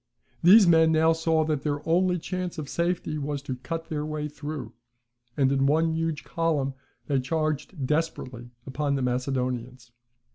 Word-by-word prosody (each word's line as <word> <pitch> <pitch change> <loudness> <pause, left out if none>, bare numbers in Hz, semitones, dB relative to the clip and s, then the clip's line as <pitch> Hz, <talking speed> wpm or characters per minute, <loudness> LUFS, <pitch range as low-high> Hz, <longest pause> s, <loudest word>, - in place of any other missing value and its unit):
These 200 +5 +8
men 160 -2 +5
now 160 +1 +4
saw 160 -1 +1
that 155 -3 -1
their 145 0 -3
only 180 +2 +3
chance 180 +1 -4
of 155 -3 -5
safety 170 -1 -1
was 140 -1 -3
to 130 -3 -4
cut 165 +6 -5
their 150 -2 -3
way 150 0 -3
through; 145 -5 -7 0.6
and 135 -2 +3
in 135 0 +2
one 160 +3 +2
huge 165 -2 -2
column 155 -5 -1 0.3
they 140 -2 +1
charged 155 +2 -2
desperately 130 -5 -2 0.2
upon 140 +1 -1
the 135 - -1
Macedonians. 125 -1 -2
150 Hz, 155 wpm, -26 LUFS, 135-165 Hz, 0.6 s, These